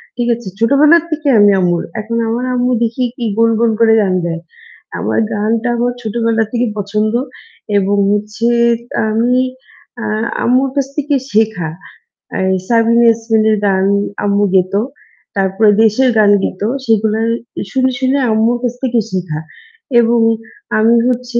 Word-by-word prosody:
ঠিক 240 Hz, 0 st, -2 dB
আছে? 235 Hz, -3 st, -11 dB
ছোটবেলা 280 Hz, +8 st, +5 dB
থেকেই 300 Hz, -3 st, 0 dB
আমি 205 Hz, 0 st, +6 dB
আম্মুর। 175 Hz, -2 st, 0 dB, 0.2 s
এখন 230 Hz, +2 st, -4 dB
আমার 240 Hz, +3 st, -2 dB
আম্মু 250 Hz, 0 st, 0 dB
দেখি 230 Hz, +2 st, -1 dB
কি, 240 Hz, -, -4 dB
গুন 230 Hz, 0 st, +4 dB
গুন 235 Hz, -1 st, +2 dB
করে 225 Hz, -1 st, +4 dB
গান 190 Hz, -3 st, 0 dB
গায়। 165 Hz, -1 st, -3 dB, 0.6 s
আমার -, -, -1 dB
গানটা 220 Hz, +3 st, -1 dB
আমার 245 Hz, +1 st, 0 dB
ছোটবেলা 225 Hz, 0 st, 0 dB
থেকেই 240 Hz, -2 st, -1 dB
পছন্দ 210 Hz, +2 st, -1 dB, 0.6 s
এবং 200 Hz, +1 st, +1 dB, 0.2 s
হচ্ছে 210 Hz, +2 st, -2 dB, 0.6 s
আমি 230 Hz, +3 st, +1 dB, 0.7 s
আ -, -, -4 dB, 0.4 s
আম্মুর 255 Hz, +3 st, +2 dB
কাছ 275 Hz, -2 st, 0 dB
থেকে 295 Hz, 0 st, 0 dB, 0.2 s
শেখা। 210 Hz, -6 st, 0 dB, 0.7 s
এ -, -, -2 dB, 0.3 s
সাবিনা 230 Hz, 0 st, +3 dB
ইয়াসমিনের 225 Hz, -1 st, +2 dB
গান 190 Hz, -1 st, +2 dB, 0.4 s
আম্মু 200 Hz, 0 st, +2 dB
গেত। 185 Hz, 0 st, +2 dB, 0.6 s
তারপরে 195 Hz, +2 st, +2 dB
দেশের 225 Hz, +4 st, +3 dB
গান 210 Hz, -1 st, +5 dB
গেত 185 Hz, -, -4 dB, 0.2 s
সেগুলার 220 Hz, 0 st, +1 dB, 0.4 s
শুনে, 260 Hz, 0 st, +1 dB
শুনে 265 Hz, +1 st, +1 dB
আম্মুর 225 Hz, +2 st, +2 dB
কাছ 245 Hz, -1 st, -1 dB
থেকে 245 Hz, -2 st, +1 dB
শিখা। 175 Hz, -5 st, -3 dB, 0.6 s
এবং 235 Hz, 0 st, +3 dB, 0.6 s
আমি 225 Hz, +2 st, +4 dB
হচ্ছে 250 Hz, -1 st, -1 dB
225 Hz, 140 wpm, -15 LUFS, 210-245 Hz, 0.7 s, আমি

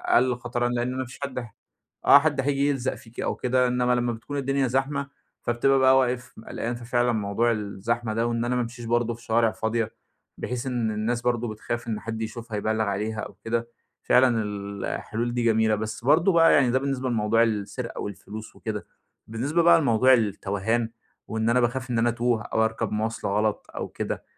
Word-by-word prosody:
أقل 125 Hz, 0 st, +4 dB
خطرًا 120 Hz, 0 st, -2 dB
لإن 120 Hz, 0 st, -1 dB
أنا 130 Hz, -, -3 dB
ما 130 Hz, -, -2 dB
فيش 130 Hz, -, -12 dB
حد 140 Hz, -2 st, -5 dB, 0.7 s
آه، 140 Hz, -, +9 dB
حد 145 Hz, -2 st, +1 dB
هييجي 140 Hz, +1 st, +1 dB
يلزق 130 Hz, -2 st, -1 dB
فيكِ 120 Hz, -3 st, -14 dB
أو -, -, -1 dB
كده، 125 Hz, 0 st, +2 dB
إنمّا 125 Hz, 0 st, +2 dB
لمّا 120 Hz, -1 st, 0 dB
بتكون 130 Hz, +6 st, -6 dB
الدنيا 135 Hz, 0 st, +1 dB
زحمة، 140 Hz, +2 st, -1 dB, 0.3 s
فبتبقى 135 Hz, +3 st, +2 dB
بقى 130 Hz, 0 st, +6 dB
واقف 125 Hz, -1 st, 0 dB
م 110 Hz, -, -12 dB
قَلقان، 120 Hz, +1 st, -3 dB
ففعلًا 120 Hz, 0 st, 0 dB
موضوع 110 Hz, +2 st, +1 dB
الزحمة 110 Hz, +2 st, -2 dB
ده 115 Hz, +2 st, +1 dB
وإن 115 Hz, 0 st, -1 dB
أنا 125 Hz, +1 st, 0 dB
ما 125 Hz, -, +1 dB
أمشيش 120 Hz, 0 st, -6 dB
برضه 120 Hz, 0 st, +1 dB
في 115 Hz, +1 st, -13 dB
شارع 115 Hz, 0 st, +2 dB
فاضية، 110 Hz, 0 st, -1 dB, 0.5 s
بحيث 125 Hz, +1 st, -4 dB
إن 120 Hz, -4 st, 0 dB
الناس 110 Hz, +3 st, -1 dB
برضه 120 Hz, -1 st, 0 dB
بتخاف 120 Hz, +2 st, -5 dB
إن 110 Hz, -2 st, -2 dB
حد 115 Hz, 0 st, -5 dB
يشوفها 110 Hz, 0 st, -5 dB
يبلّغ 110 Hz, +1 st, 0 dB
عليها 105 Hz, +2 st, -2 dB
أو -, -, -6 dB
كده، 115 Hz, +1 st, -1 dB, 0.3 s
فعلًا 125 Hz, -3 st, +4 dB
ال 100 Hz, -1 st, -5 dB
الحلول 120 Hz, +2 st, -3 dB
دي 120 Hz, -1 st, 0 dB
جميلة. 110 Hz, -1 st, +3 dB
بس 110 Hz, +2 st, -5 dB
برضه 160 Hz, +7 st, +5 dB
بقى 165 Hz, -1 st, +6 dB
يعني 130 Hz, -3 st, +4 dB
ده 130 Hz, -, +2 dB
بالنسبة 135 Hz, -1 st, -2 dB
لموضوع 115 Hz, 0 st, +3 dB
السرقة 105 Hz, -3 st, -3 dB
والفلوس 105 Hz, +2 st, -8 dB
وكده، -, -, -5 dB, 0.4 s
بالنسبة 140 Hz, +10 st, 0 dB
بقى 170 Hz, -1 st, +6 dB
لموضوع 130 Hz, 0 st, +4 dB
التَوَهان 110 Hz, 0 st, 0 dB, 0.4 s
وإن 110 Hz, +1 st, -1 dB
أنا 125 Hz, -, +4 dB
باخاف 125 Hz, +2 st, -1 dB
إن 120 Hz, -, 0 dB
أنا 120 Hz, -, +3 dB
أتوه 120 Hz, -1 st, 0 dB
أو 110 Hz, +1 st, +1 dB
أركب 110 Hz, -1 st, -2 dB
مواصلة 110 Hz, -1 st, -2 dB
غلط 105 Hz, +1 st, 0 dB
أو -, -, -3 dB
كده، -, -, -4 dB
120 Hz, 195 wpm, -25 LUFS, 110-125 Hz, 0.7 s, آه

